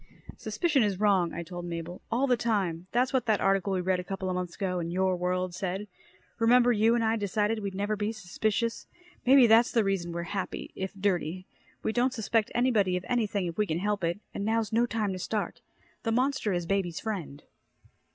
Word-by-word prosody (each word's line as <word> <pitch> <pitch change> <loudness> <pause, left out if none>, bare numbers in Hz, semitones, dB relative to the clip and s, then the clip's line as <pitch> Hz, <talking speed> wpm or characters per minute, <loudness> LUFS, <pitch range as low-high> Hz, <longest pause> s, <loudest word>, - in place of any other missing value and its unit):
"Suspicion 315 -6 +1
is 200 -4 0
wrong," 195 -5 +3
I 170 - -5
told 175 +1 -7
Mabel. 170 +1 -6
"All 245 +4 +2
the 255 -2 +3
time. 190 -7 -1
That's 250 +3 +1
what 255 -3 +1
that 215 -2 +3
article 195 0 +2
we 185 - 0
read 185 0 +1
a - - -4
couple 190 0 -3
months 180 -1 -3
ago 180 -2 -1
in 170 -1 -3
Your 185 +1 +1
World 180 0 -1
said. 190 +2 -3 0.5
Remember 245 +2 +5
you 225 +1 +3
and 235 - +1
I 225 0 +2
decided 210 +1 0
we'd 200 -2 -4
never 205 +2 -1
be 210 +1 -1
suspicious. 220 +2 -2 0.4
Maybe 265 -1 +8
that's 230 +1 +5
the 230 - +3
reason 195 -3 -1
we're 170 0 -3
happy 190 +2 -4
if 190 0 -4
dirty. 185 -2 -1 0.4
We 220 - 0
don't 250 +2 +1
suspect 220 -1 0
anybody 220 -7 +2
of 180 - -6
anything 215 -6 0
if 170 +1 -5
we 210 - +2
can 160 - -1
help 205 +1 -1
it 170 +4 0
and 200 - -3
now's 220 0 0
no 235 +2 +3
time 215 -4 -1
to 185 - -5
start. 210 +3 -3 0.4
The 225 - -1
monster 255 -2 +1
is 175 -2 -1
baby's 180 -2 -1
friend." 175 -10 -5
200 Hz, 205 wpm, -28 LUFS, 180-225 Hz, 0.5 s, Maybe